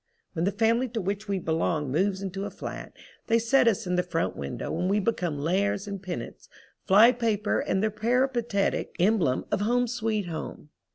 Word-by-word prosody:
When 165 0 -1
the 200 - +2
family 230 +5 +2
to - - +2
which 200 +2 -3
we 200 -1 0
belong 160 -4 -1
moves 190 +5 0
into 195 +1 -4
a - - -4
flat - - -7 0.4
they 230 - +4
set 235 +2 +3
us 215 -5 +2
in 180 0 0
the - - +4
front 175 -2 -2
window 70 - -4
and 180 +3 -1
we 205 +2 +2
become 180 -7 -1
lares 195 +6 0
and 200 -2 -5
penates, 185 -3 -7 0.4
fly 210 +5 +7
paper 225 -4 0
and 190 +2 0
the 215 - +1
peripatetic 235 -1 0
emblem 180 -9 +2
of - - 0
"Home 245 +4 +2
Sweet 220 -3 -1
Home." 160 -2 -7
200 Hz, 185 wpm, -27 LUFS, 180-225 Hz, 0.4 s, fly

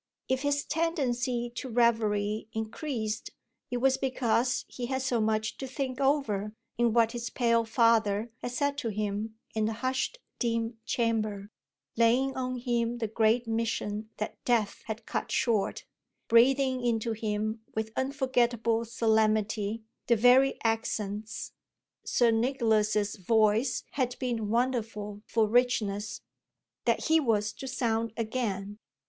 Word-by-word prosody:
If 260 0 0
his 285 0 0
tendency 250 -7 -1
to 260 +2 -5
reverie 215 -3 +1
increased 220 0 -3 0.4
it 245 - -1
was 265 +2 +3
because 250 -2 +1
he 245 -1 -5
had 265 0 -1
so 245 -4 +1
much 220 0 0
to 265 - -5
think 255 0 -4
over 220 -7 +1 0.2
in 240 -1 +2
what 230 0 +3
his 240 0 -4
pale 230 -2 +2
father 225 -2 +2
had - - -3
said 285 +2 0
to 240 -5 -2
him 215 +1 -3 0.2
in 220 -1 +1
the 220 - -1
hushed 260 - -1 0.2
dim 230 -1 -1
chamber, 215 -3 -1 0.4
laying 245 +4 +3
on 255 -1 -2
him 240 -1 -1
the 230 -2 -2
great 225 +2 +2
mission 225 -2 -2
that 215 - -5
death 230 -4 +1
had 220 0 -5
cut - - -3
short, 220 -5 0 0.4
breathing 260 +2 +4
into 230 -1 0
him 215 0 -2
with 220 0 -2
unforgettable 240 -4 +1
solemnity 220 -1 +1 0.2
the 235 - +5
very 250 +4 +5
accents 220 -2 -2 0.5
Sir 240 -2 +3
Nicholas's 220 -4 +1
voice 220 +5 +2
had 250 -3 -1
been 235 -5 -2
wonderful 225 -4 -1
for 220 -2 +2
richness 220 -2 +1 0.6
that - - +2
he 320 0 +5
was 215 -6 +1
to 265 - -8
sound 230 -3 -1
again. 215 -3 -3
230 Hz, 130 wpm, -29 LUFS, 215-250 Hz, 0.6 s, the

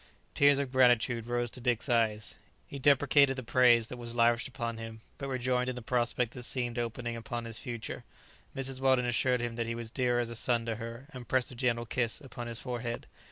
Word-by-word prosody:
Tears 145 0 +5
of 140 -2 -2
gratitude 120 -2 +3
rose 120 -1 -1
to 125 - -8
Dick's 120 -1 0
eyes. 110 -5 +1 0.3
He 140 - -8
deprecated 140 0 +4
the 130 - -5
praise 120 -1 +5
that 125 - -8
was 120 -1 -5
lavished 115 -1 +3
upon 115 -3 -4
him, 110 -1 -8 0.2
but 140 - -4
rejoiced 125 -1 0
in 130 - -3
the 125 - -7
prospect 120 0 0
that 125 - -8
seemed 120 -1 -2
opening 120 0 -3
upon 115 +1 -5
his 115 -1 -4
future. 120 -2 -5 0.5
Mrs. 135 -1 -2
Weldon 130 -2 +3
assured 125 +1 +2
him 120 -1 -3
that 115 -1 -1
he 115 - -2
was 115 -1 -6
dear 125 -2 +1
as 120 -1 -2
a - - -5
son 120 0 +1
to 115 -2 -2
her, 115 +3 -7
and 125 -2 -9
pressed 130 -1 +1
a - - -9
gentle 120 -1 0
kiss 115 0 -1
upon 125 -4 -8
his 115 -1 -2
forehead. 120 -2 -4
120 Hz, 215 wpm, -31 LUFS, 115-130 Hz, 0.5 s, Tears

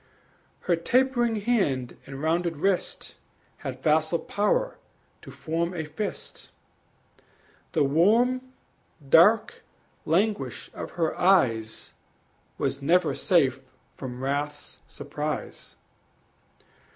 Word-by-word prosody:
Her 175 - +2
tapering 240 +3 +1
hand 165 - 0
and 135 +1 -7
rounded 165 0 0
wrist 190 +3 -1 0.4
Had 130 -1 -7
facile 155 +2 +2
power - - -1 0.4
to - - -12
form 170 +2 -3
a 160 -2 -3
fist; 200 +7 -6 1.2
The 155 - +3
warm, 220 - +3 0.7
dark 205 +10 +5 0.4
languish 160 - 0
of - - -7
her 165 -2 -1
eyes 120 - +2 0.6
Was 140 - -2
never 170 +3 +3
safe 135 -7 +2 0.3
from 125 -1 -7
wrath's 145 +2 -3
surprise. 150 +1 -5
165 Hz, 90 wpm, -26 LUFS, 140-200 Hz, 1.2 s, dark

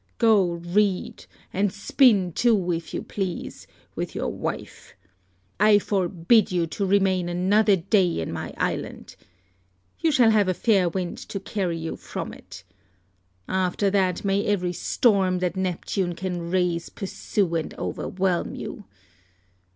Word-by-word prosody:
Go 210 -7 +4
read, 180 +3 -1 0.3
and 195 +1 +1
spin 200 -2 +3
too, 205 -6 +2
if 165 -1 -4
you - - -4
please, 190 -4 -5 0.3
with - - -5
your - - -2
wife. - - -6 0.6
I 210 0 +6
forbid 190 +1 +2
you 175 -2 +1
to 195 +4 -3
remain 190 -2 +2
another 195 +4 +3
day 185 - +1
in 80 - -3
my - - -5
island. - - -3 0.8
You 325 - +2
shall 245 -5 +5
have 210 -3 +3
a 185 - +1
fair 195 -5 +3
wind 180 0 -4
to 195 - -4
carry 190 -3 -2
you 165 0 -5
from - - -6
it. 100 - -12 0.8
After 190 +1 0
that 190 -2 +1
may 200 +1 +1
every 180 -4 0
storm 190 0 +2
that 180 -1 -1
Neptune 185 -1 -2
can 175 -1 -4
raise 175 -2 0
pursue 195 -2 -2
and 165 -2 -2
overwhelm 185 -2 -2
you. 205 - -7
185 Hz, 135 wpm, -24 LUFS, 175-205 Hz, 0.8 s, I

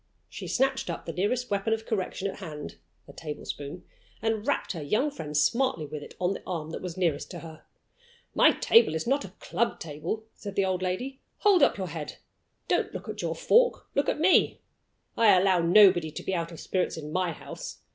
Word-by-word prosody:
She - - -8
snatched 265 -5 +1
up 170 - -5
the 165 - -5
nearest 235 +7 -1
weapon 200 +2 +1
of 225 0 -3
correction 200 -2 -2
at 195 - -5
hand 155 -6 -7 0.3
a - - -12
tablespoon 145 -2 -6 0.4
and 225 +1 -1
rapped 285 - 0
her 165 - -5
young 215 - +1
friend 150 - -4
smartly 230 - +2
with 150 0 -6
it - - -11
on 180 +1 +1
the - - -7
arm 160 -4 -4
that - - -5
was 180 -2 -6
nearest 165 -6 0
to 175 - -7
her. 160 -1 -11 0.7
"My - - +6
table 225 -9 +4
is 160 - -2
not 275 +4 +2
the 195 - -6
club 235 - -1
table," 165 +8 -4
said 200 -2 -8
the 195 - +2
old 185 -1 -1
lady. 245 +9 -3 0.2
"Hold 400 -5 +5
up 280 - +4
your 190 -2 -3
head. 160 -3 -6 0.5
Don't - - +1
look - - -6
at - - -4
your - - -2
fork - - +3
look 280 - +1
at - - -1
me. 360 +4 +4 0.5
I 210 -5 +6
allow 185 -1 +4
nobody 175 -1 +6
to 150 - -7
be 190 - -2
out 170 -1 -2
of 165 - -10
spirits 185 -3 -1
in 150 -1 -6
My 180 0 0
house. 155 - -9
185 Hz, 205 wpm, -28 LUFS, 165-225 Hz, 0.7 s, My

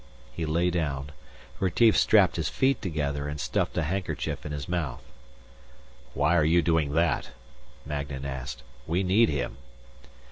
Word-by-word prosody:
He 80 -2 -3
lay 85 +3 +1
down. 75 -5 -2 0.5
Retief 105 +4 +4
strapped 100 -6 +4
his 80 -2 -1
feet 135 -2 +1
together 75 -6 -2
and 75 0 -5
stuffed - - -1
a 85 - +2
handkerchief 90 -1 -3
in - - -6
his 75 -1 -5
mouth. 85 -8 -3 1.1
"Why 75 +4 +3
are 80 - +4
you 85 +2 +4
doing 80 -4 +1
that?" 80 +1 +1 0.6
Magnan 70 -2 -4
asked. 65 -1 -5 0.2
"We 85 +4 +1
need 100 +5 +4
him." - - -2
80 Hz, 145 wpm, -27 LUFS, 70-90 Hz, 1.1 s, Retief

